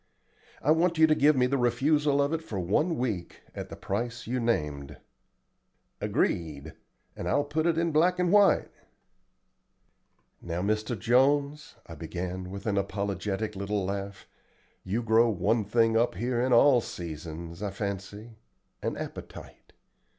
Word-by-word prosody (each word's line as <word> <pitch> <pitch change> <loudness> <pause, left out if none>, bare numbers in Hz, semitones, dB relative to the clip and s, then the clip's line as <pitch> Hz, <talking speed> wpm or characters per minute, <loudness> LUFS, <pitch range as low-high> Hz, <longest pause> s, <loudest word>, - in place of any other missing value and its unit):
I 150 - +3
want 165 +1 +2
you 160 - +7
to 155 - +4
give 150 0 +4
me 125 -1 +3
the 135 +2 0
refusal 140 +4 +2
of 140 +3 -1
it 165 - -1
for 105 -10 -5
one 150 - +1
week 110 -8 -3
at - - -7
the - - -7
price 115 +4 -4
you 125 +3 -2
named." 75 - -2 1.0
"Agreed, 80 -2 -1 0.4
and - - -5
I'll 145 - +2
put 155 +3 -1
it 165 -2 +1
in 170 0 +1
black 175 +4 +3
and 180 -1 +1
white." 205 -1 +4 1.7
"Now, 85 +1 -3
Mr. 110 +3 -1
Jones," 140 +6 +1
I - - -10
began 90 +3 -5
with 100 +1 -8
an 100 -3 +1
apologetic 100 +1 -3
little 100 0 -2
laugh, 100 +1 -5 0.6
"you 110 +6 -2
grow 115 +1 +4
one 110 +3 +1
thing 115 +2 +2
up 115 -3 +2
here 120 +5 -1
in 130 +1 0
all 125 +1 +6
seasons, 85 -1 -7
I 105 - -2
fancy 100 +3 -6 0.4
an - - -3
appetite. - - -9
115 Hz, 150 wpm, -28 LUFS, 95-140 Hz, 1.7 s, you